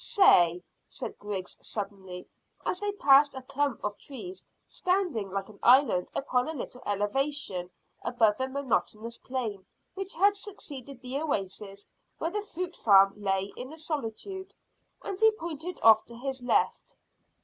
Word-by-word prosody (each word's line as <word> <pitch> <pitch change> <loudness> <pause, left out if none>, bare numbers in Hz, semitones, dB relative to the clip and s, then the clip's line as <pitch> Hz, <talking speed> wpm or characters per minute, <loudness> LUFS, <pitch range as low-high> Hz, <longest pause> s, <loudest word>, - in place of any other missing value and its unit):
"Say," 180 - +5 0.2
said - - -7
Griggs 200 -3 -5
suddenly, 190 -3 -6 0.4
as 365 - -1
they 410 0 -1
passed 285 -5 +5
a 265 - -5
clump 280 -1 -1
of 205 0 -2
trees 360 +7 -8 0.2
standing 360 - 0
like 195 +1 -3
an 215 -2 -15
island 245 -8 +5
upon 250 -1 +1
a - - -3
little 250 -2 -7
elevation 205 -2 -1 0.3
above 225 -4 +2
the 260 - 0
monotonous 235 -4 -2
plain 230 -7 -4 0.3
which 390 +1 -5
had 400 +3 +4
succeeded 280 - -8
the 260 +3 -3
oasis 200 -7 -3 0.3
where 330 - -2
the 420 +2 -1
fruit 360 -3 -5
farm 195 -2 +6
lay 195 -1 -1
in 250 +1 -7
the 315 - -10
solitude, 320 - -5 0.5
and 390 - -4
he 445 - +7
pointed 340 -2 -6
off 220 -1 +8
to 235 - -11
his 265 +1 -4
left. - - +1
260 Hz, 150 wpm, -29 LUFS, 205-325 Hz, 0.5 s, off